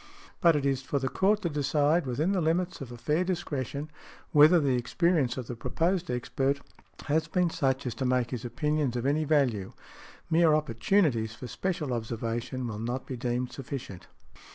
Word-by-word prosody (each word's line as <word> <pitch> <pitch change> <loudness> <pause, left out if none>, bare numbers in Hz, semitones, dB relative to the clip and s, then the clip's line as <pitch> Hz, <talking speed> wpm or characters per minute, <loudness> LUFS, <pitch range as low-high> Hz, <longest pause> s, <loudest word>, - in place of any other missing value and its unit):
But 170 -4 +6
it 145 -2 0
is 135 -1 +1
for 135 +2 -2
the 135 -1 -1
Court 205 +6 +2
to 170 - 0
decide, 150 +2 +1
within 145 +9 0
the 190 -3 +1
limits 170 +2 0
of 130 -3 -7
a 120 - -8
fair 150 +9 +1
discretion, 150 -5 -3 0.4
whether 155 +4 +7
the 140 -4 +2
experience 140 0 +1
of 130 - -4
the 120 - -6
proposed 175 +8 -1
expert 135 +3 -1 0.5
has 155 +2 +1
been 175 0 +1
such 135 -4 0
as 125 - -2
to - - +1
make 125 -1 +1
his 125 -3 -4
opinions 145 +1 -1
of 120 +1 -2
any 150 +3 +1
value; 130 -10 +1 0.5
mere 165 -2 +4
opportunities 130 - +1
for 125 - -9
special 150 - -2
observation 115 +2 -3
will 110 -2 -5
not 120 +4 -3
be 130 - -5
deemed 125 +1 -2
sufficient. 125 -9 -7
140 Hz, 175 wpm, -28 LUFS, 125-160 Hz, 0.5 s, whether